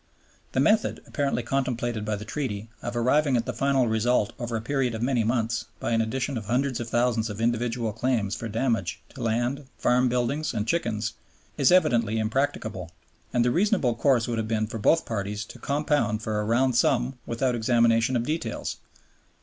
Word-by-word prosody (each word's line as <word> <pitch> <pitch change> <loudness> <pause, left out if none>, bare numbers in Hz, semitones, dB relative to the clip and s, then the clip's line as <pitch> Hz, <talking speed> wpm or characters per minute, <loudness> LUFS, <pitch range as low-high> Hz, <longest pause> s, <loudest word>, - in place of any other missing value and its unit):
The - - +1
method, 210 +11 +3
apparently 140 -4 -1
contemplated 120 -4 -1
by 105 0 -1
the 105 +1 -7
Treaty, 115 -4 -4
of 120 - -4
arriving 130 +3 +3
at 115 - -1
the - - -3
final 135 -3 +2
result 110 0 +1
over 120 -2 -3
a 110 - -1
period 125 0 0
of 110 - -3
many 125 -2 +2
months 115 0 0
by - - -2
an 115 -1 +3
addition 130 +3 -2
of 105 - -10
hundreds 130 +3 0
of 120 -1 -5
thousands 120 -2 +1
of 105 0 -6
individual 115 -1 0
claims 115 -3 0
for 115 - -5
damage 115 -4 -1
to - - -10
land, 120 +5 -1
farm 125 +1 +3
buildings, 125 +5 -1
and 105 - -1
chickens, 110 -9 -1 0.4
is 140 - +4
evidently 115 - +3
impracticable; 110 -5 -1 0.4
and 120 -1 +2
the 125 - +3
reasonable 180 - +2
course 120 0 +2
would 115 -1 -1
have 110 - -2
been 110 -1 0
for 110 +1 -6
both 160 +10 +3
parties 105 -1 -3
to - - -12
compound 145 -7 0
for 110 -1 -1
a - - -3
round 120 +3 +2
sum 125 +1 +2
without 125 +2 0
examination 115 0 +3
of 120 - +1
details. 155 +6 -3
120 Hz, 185 wpm, -26 LUFS, 110-130 Hz, 0.4 s, is